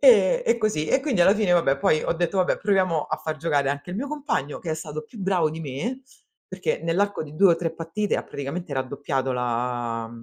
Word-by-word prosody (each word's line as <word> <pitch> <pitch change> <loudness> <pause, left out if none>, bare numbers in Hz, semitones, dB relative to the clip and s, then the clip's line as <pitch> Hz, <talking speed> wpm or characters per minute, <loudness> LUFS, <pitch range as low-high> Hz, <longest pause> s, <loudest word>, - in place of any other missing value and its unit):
E - - +6
e 235 - +3
così. 210 -9 0
E 265 - +3
quindi 265 -10 0
alla 195 +4 +6
fine 210 -4 +1
vabbè, 150 -6 +3
poi 155 +2 +3
ho - - +1
detto: 170 +2 -1
"Vabbè, 185 -1 +2
proviamo 185 -6 +2
a - - -3
fà 155 -1 -4
giocare 145 -3 +1
anche 145 +5 -5
il 185 - -4
mio 270 +5 -2
compagno", 275 - -2
che 165 - -4
è - - +1
stato 155 -1 -6
più 215 - -14
bravo 185 -5 +1
di 160 - -6
me, 210 - -4 0.4
perché 470 - -2
nell'arco 195 +4 0
di 150 0 -11
2 190 0 +6
o - - +1
3 165 -2 -2
partite 165 +6 -2
ha - - -2
praticamente 145 +4 -5
raddoppiato 135 0 -2
la 120 -1 -2
165 Hz, 225 wpm, -25 LUFS, 140-200 Hz, 0.4 s, E